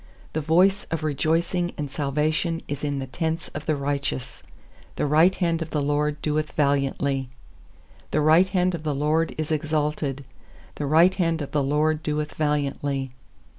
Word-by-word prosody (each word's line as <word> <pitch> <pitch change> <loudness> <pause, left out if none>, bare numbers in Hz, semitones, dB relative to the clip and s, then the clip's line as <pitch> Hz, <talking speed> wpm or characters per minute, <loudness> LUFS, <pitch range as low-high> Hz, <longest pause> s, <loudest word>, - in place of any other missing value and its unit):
15The 155 - -1
voice 185 +6 +4
of 165 -1 -4
rejoicing 165 +4 0
and 145 -2 -4
salvation 155 +4 0
is 145 0 -5
in 145 -1 -1
the 135 - -3
tents 160 +4 -3
of 145 - -8
the 155 - +2
righteous; 140 -2 -3 0.5
The - - 0
right 160 +6 +4
hand 170 -2 0
of 165 - -4
the 150 - -1
LORD 145 +1 0
doeth 155 0 -1
valiantly. 140 -2 0 0.8
16The 150 0 +1
right 165 +4 +6
hand 185 -1 +1
of 170 - -4
the 150 -2 -2
LORD 155 +3 +1
is 155 0 -3
exalted; 150 -2 -1 0.5
The 145 - -4
right 165 +5 +5
hand 165 -4 0
of 140 - -8
the 150 - +1
LORD 150 +3 +1
doeth 150 -1 -2
valiantly. 140 -3 -1
150 Hz, 165 wpm, -24 LUFS, 145-160 Hz, 0.8 s, right